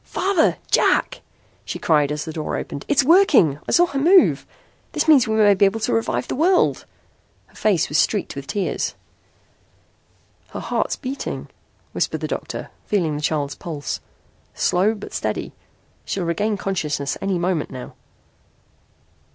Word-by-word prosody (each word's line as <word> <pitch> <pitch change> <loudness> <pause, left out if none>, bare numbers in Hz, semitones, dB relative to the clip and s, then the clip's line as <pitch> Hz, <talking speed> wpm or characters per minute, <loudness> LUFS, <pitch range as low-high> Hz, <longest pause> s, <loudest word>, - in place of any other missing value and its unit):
"Father! 375 -4 +1
Jack!" - - +2 0.4
she - - -5
cried 150 -3 +2
as 150 0 -3
the 160 - -6
door 155 -1 -3
opened. 140 - -6
"It's 285 -1 +3
working. 275 - +5
I - - 0
saw 350 - +5
her 280 -5 -3
move. 355 +6 +4 0.5
That - - 0
means 275 -6 +6
we 220 - 0
may 210 -2 +5
be 200 +1 +4
able 200 +3 +1
to 210 - 0
revive 115 +2 -1
the - - -3
world!" 350 +6 +2 0.6
Her - - -28
face 200 -7 +1
was 150 - +1
streaked 205 -4 0
with 140 0 -7
tears. 200 -2 -2 1.6
"Her - - -4
heart's - - -1
beating," 270 +1 -5 0.4
whispered - - -2
the - - -2
doctor, - - -5 0.2
feeling 170 -7 0
the 145 - -4
child's 150 -2 -1
pulse. 150 -4 -5 0.6
"Slow 195 +5 +2
but 205 - -10
steady. - - -3 0.5
She'll 190 -3 -3
regain 205 +6 -1
consciousness 155 -8 -2
any 195 -2 0
moment 175 -3 -1
now." 130 -2 -8
195 Hz, 150 wpm, -21 LUFS, -, 1.6 s, means